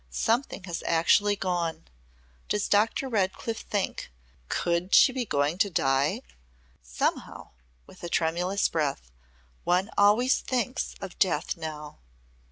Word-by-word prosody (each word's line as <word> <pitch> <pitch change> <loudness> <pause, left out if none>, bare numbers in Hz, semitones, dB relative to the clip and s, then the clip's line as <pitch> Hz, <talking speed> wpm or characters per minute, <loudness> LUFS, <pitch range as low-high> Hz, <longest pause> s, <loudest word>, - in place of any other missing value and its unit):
Something 225 - -1
has 175 -3 -5
actually 205 +5 +3
gone. 175 - -2 0.6
Does 210 -1 0
Doctor 220 +6 +2
Redcliff 215 0 -1
think 205 -2 -3 0.4
Could 175 +2 0
she - - +7
be 255 -2 -2
going 145 0 0
to 200 - +3
die? 135 -3 +1 0.6
Somehow," - - -3 0.3
with - - -17
a 175 - -4
tremulous 175 +4 +1
breath, 140 - -2 0.5
"one 185 +4 +1
always 215 +6 +4
thinks 255 0 -2
of 195 -2 -8
death 185 - +1
now." 155 -2 -7
180 Hz, 120 wpm, -27 LUFS, 160-205 Hz, 0.6 s, she